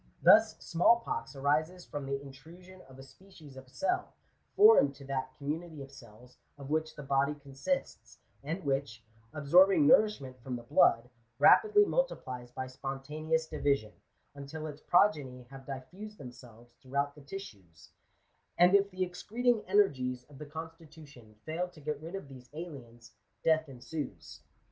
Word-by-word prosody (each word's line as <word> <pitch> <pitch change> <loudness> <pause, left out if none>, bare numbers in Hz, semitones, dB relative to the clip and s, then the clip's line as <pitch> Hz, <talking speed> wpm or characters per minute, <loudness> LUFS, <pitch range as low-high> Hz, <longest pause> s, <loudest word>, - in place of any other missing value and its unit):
Thus, - - +6
small 230 +8 +3
pox 190 - -5
arises 155 +6 0
from 145 -2 -6
the 140 0 -2
intrusion 165 +7 -14
of 130 - -14
a 135 - -11
species 155 -2 -16
of 130 -1 -12
cell, 360 - -2 0.4
foreign 415 - +7
to 140 0 -13
that 130 -1 -3
commu 150 +3 -2
nity 160 -5 -10
of 135 - -13
cells 120 -1 -16 0.2
of 140 0 -9
which 155 0 -1
the 150 - -8
body 140 +1 +1
consists, 145 - -4 0.3
and 165 +6 -4
which, 135 -5 -2 0.3
absorbing 180 - +5
nourishment 210 - +3
from 125 0 -5
the 120 - -7
blood, 115 0 +3 0.3
rapidly 420 - +6
multiplies 130 - -2
by 130 +1 -5
spontaneous 145 +5 -3
division, 140 -8 -1 0.4
until 145 +2 -8
its 150 -1 -8
progeny 145 -10 +2
have 135 -1 -12
diffused 180 +11 -8
themselves 120 -2 -13
throughout 140 +2 -2
the 150 - -15
tissues; 105 - -11 0.7
and 180 +2 +6
if 200 0 +4
the 185 -1 -2
excreting 225 +6 -1
energies 130 -11 +1
of 140 +1 -16
the 150 - -8
constitution 155 -7 -11
fail 165 +3 -2
to 180 -3 -17
get 150 0 -4
rid 165 +4 -7
of 195 -7 -7
these 130 -2 -13
aliens, 120 -8 -10 0.3
death 160 -2 +2
ensues. 125 - -7
145 Hz, 150 wpm, -31 LUFS, 130-175 Hz, 0.7 s, foreign